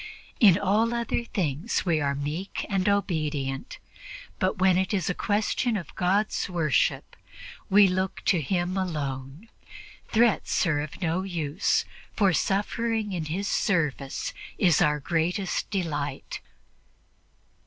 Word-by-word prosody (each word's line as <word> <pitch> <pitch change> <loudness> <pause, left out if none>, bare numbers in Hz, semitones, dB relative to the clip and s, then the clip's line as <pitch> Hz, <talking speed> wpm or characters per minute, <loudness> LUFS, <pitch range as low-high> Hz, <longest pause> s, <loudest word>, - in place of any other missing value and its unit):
In 195 -6 +7
all 215 +4 +1
other 235 0 -1
things 175 - -1
we 165 -4 +2
are 140 -1 0
meek 150 +7 -4
and 195 -2 +1
obedient, 155 -9 -1 0.6
but 185 - 0
when 185 0 +4
it 190 +3 +1
is 180 -3 0
a - - -2
question 215 +4 0
of 175 - -8
God's 200 +3 0
worship, 165 -5 0 0.5
we 200 +1 +7
look 185 +1 -2
to 175 -4 +3
Him 175 +5 -1
alone. 145 - -4 0.6
Threats 230 -3 +2
are 150 -4 +1
of 150 +5 -7
no 170 +2 0
use, 170 -4 0 0.3
for 195 -4 +3
suffering 210 +3 0
in 170 -3 -3
His 185 +6 -3
service 150 -8 -1 0.2
is 175 -6 +4
our 150 0 +3
greatest 175 +5 -1
delight." 150 -8 -3
180 Hz, 125 wpm, -26 LUFS, 155-200 Hz, 0.6 s, In